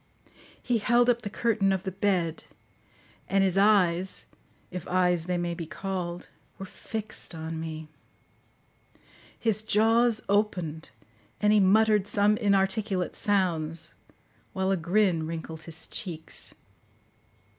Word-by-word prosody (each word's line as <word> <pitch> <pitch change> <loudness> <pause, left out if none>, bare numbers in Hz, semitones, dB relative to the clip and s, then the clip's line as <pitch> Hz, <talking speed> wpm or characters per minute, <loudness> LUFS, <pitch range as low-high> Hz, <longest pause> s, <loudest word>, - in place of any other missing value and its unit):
He 240 -3 +1
held 240 +3 +4
up 240 0 -2
the 205 - -5
curtain 215 -2 +1
of 190 -1 -1
the 190 - -3
bed; 185 -4 -1 0.8
and 195 0 +3
his 190 -2 +1
eyes, 190 -3 +2 0.5
if 180 -2 -6
eyes 180 -2 +2
they 180 0 -1
may 175 0 -2
be 165 -1 -6
called, 180 -1 -4 0.3
were 195 - -7
fixed 215 -1 -4
on 160 0 -5
me. 160 -1 -6 1.5
His 220 -2 0
jaws 225 +1 +3
opened, 180 -6 -1 0.5
and 210 0 +3
he 210 - +5
muttered 210 +1 +4
some 205 +1 +3
inarticulate 195 -2 +1
sounds, 170 -5 -1 0.6
while 190 0 0
a - - +3
grin 175 -2 +1
wrinkled 160 -1 -6
his 160 -1 -7
cheeks. 165 -5 -3
190 Hz, 125 wpm, -27 LUFS, 170-210 Hz, 1.5 s, he